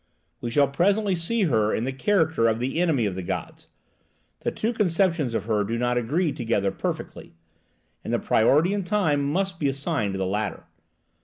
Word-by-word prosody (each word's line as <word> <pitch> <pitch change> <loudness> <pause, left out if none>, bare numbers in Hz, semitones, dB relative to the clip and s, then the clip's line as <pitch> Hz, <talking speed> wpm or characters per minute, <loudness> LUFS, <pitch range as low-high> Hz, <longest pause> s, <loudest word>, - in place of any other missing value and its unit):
We 120 - -4
shall 140 +4 +3
presently 195 +7 +1
see 205 +7 0
her 110 - +2
in 110 - -2
the 130 +2 -2
character 160 - +2
of 110 -1 +1
the 130 +7 -2
enemy 155 -10 +2
of 100 - -1
the 95 - -5
gods. 85 - -5 0.7
The - - -1
two 225 +3 -2
conceptions 170 - +1
of - - -2
her 110 -2 +1
do 115 +3 -2
not 125 +1 0
agree 145 +8 0
together 110 -6 -1
perfectly, 85 - -5 0.7
and - - -4
the - - +2
priority 150 - +3
in 205 -1 -1
time 175 -7 +1
must 180 +5 -1
be 145 - +1
assigned 135 - -1
to - - -3
the 95 - -1
latter. 105 +3 -2
140 Hz, 185 wpm, -25 LUFS, 115-180 Hz, 0.7 s, shall